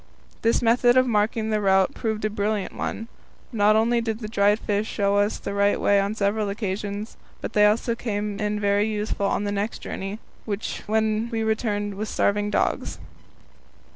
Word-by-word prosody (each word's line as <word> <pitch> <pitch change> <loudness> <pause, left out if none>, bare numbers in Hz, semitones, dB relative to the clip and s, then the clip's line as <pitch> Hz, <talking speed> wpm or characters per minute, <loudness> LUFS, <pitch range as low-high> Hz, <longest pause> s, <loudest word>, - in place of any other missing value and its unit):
This 230 +1 +2
method 240 +2 +4
of 255 - +5
marking 220 -1 0
the 215 -1 +1
route 190 -1 +3
proved 220 -2 -2
a - - +1
brilliant 210 -1 -1
one. 225 - -4 0.4
Not 215 -2 +4
only 235 +2 +3
did 225 -2 -2
the 220 -2 -6
dried 205 -1 +3
fish 210 0 -1
show 200 -2 +1
us 205 +1 +1
the 200 - -5
right 200 0 +2
way 200 0 +3
on 200 +2 -1
several 205 0 0
occasions, 205 +1 -4 0.2
but - - -6
they 210 0 +6
also 230 +3 +1
came 210 -3 -3
in 210 0 -1
very 205 +1 +2
useful 210 -2 -1
on 200 - 0
the 205 - -1
next 205 +2 -2
journey, 195 +2 -5 0.7
when 220 +1 +1
we 225 -1 -2
returned 210 -2 -1
with 210 +2 -4
starving 205 0 +1
dogs. - - -1
210 Hz, 175 wpm, -24 LUFS, 205-220 Hz, 0.7 s, they